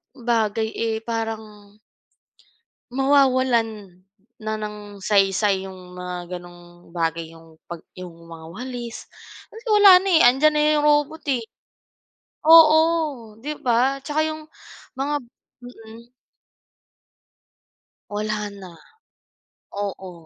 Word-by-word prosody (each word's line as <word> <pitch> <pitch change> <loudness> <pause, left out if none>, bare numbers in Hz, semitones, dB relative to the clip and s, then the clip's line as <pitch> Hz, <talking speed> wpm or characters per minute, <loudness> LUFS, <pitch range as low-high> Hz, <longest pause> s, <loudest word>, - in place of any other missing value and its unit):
bagay 225 -3 0
eh, 225 -1 -2
parang 220 -3 -6 1.2
mawawalan, 250 -8 +1 0.4
na 215 0 -3
ng 210 -1 -8
saysay, 195 0 +2
yung 185 -1 -11
mga 180 0 -6
gano'ng 175 -1 -14
bagay 165 -1 -3
yung, 165 -1 -17
'pag 170 -1 -8 0.2
yung 180 -1 -9 0.2
mga 165 -1 -11
walis, 245 +1 -7 0.4
kasi 450 +1 -14
wala 400 -3 +8
na - - -3
eh, 325 - +5
andiyan 270 +5 +4
na 300 - +1
yung 295 - +1
robot 295 +1 +1
eh. 245 -3 -1 1.0
Oo, 315 -7 +5
'di 295 +6 -5
ba, 255 +3 +1
tsaka 305 +2 0
yung 310 0 -6 0.5
mga 285 +2 -1 0.5
mm. 230 -1 -13 2.0
Wala 210 0 -3
na. 180 -2 -11 1.0
Oo. 195 -2 -5
220 Hz, 105 wpm, -22 LUFS, 190-270 Hz, 2.0 s, wala